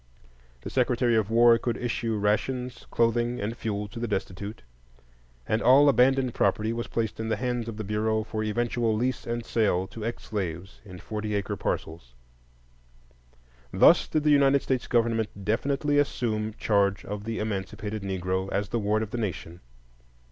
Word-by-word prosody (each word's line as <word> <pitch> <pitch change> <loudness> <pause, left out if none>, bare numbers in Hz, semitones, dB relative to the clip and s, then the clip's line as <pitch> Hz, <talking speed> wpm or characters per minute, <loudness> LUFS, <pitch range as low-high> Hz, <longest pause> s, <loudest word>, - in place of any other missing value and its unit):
The - - -7
Secretary 125 -2 +2
of 110 -2 +1
War 115 0 +6
could 120 - -2
issue 115 -2 -2
rations, 120 +4 -1
clothing, 120 +1 +1
and 110 +3 -3
fuel 105 -3 -3
to 115 - -8
the 120 - -2
destitute, 100 +1 -4 0.8
and 110 +2 +1
all 135 +4 +6
abandoned 130 -2 +3
property 110 +1 +1
was 115 0 -4
placed 110 -2 -2
in 110 0 -3
the 110 - +1
hands 120 0 -2
of 110 - -7
the 110 - -4
Bureau 110 +1 0
for 110 0 -4
eventual 115 +1 0
lease 125 +3 -2
and 120 0 -3
sale 100 -6 +1
to 110 - -8
ex 115 +2 -4
slaves 95 -3 -5
in 95 -4 -11
forty 105 +2 -4
acre 100 - -2
parcels. 80 -7 -4 1.6
Thus - - +5
did 155 - 0
the 150 - +4
United 140 -1 +4
States 130 -2 -1
government 115 -4 0
definitely 140 +6 +1
assume 110 -6 -1
charge 100 -3 +1
of 105 0 -5
the 115 +1 -4
emancipated 105 +1 -4
Negro 95 0 -2
as 100 0 -1
the 115 - -1
ward 105 +1 +1
of 110 - -7
the 120 - -3
nation. 90 -5 -4
110 Hz, 165 wpm, -27 LUFS, 105-120 Hz, 1.6 s, War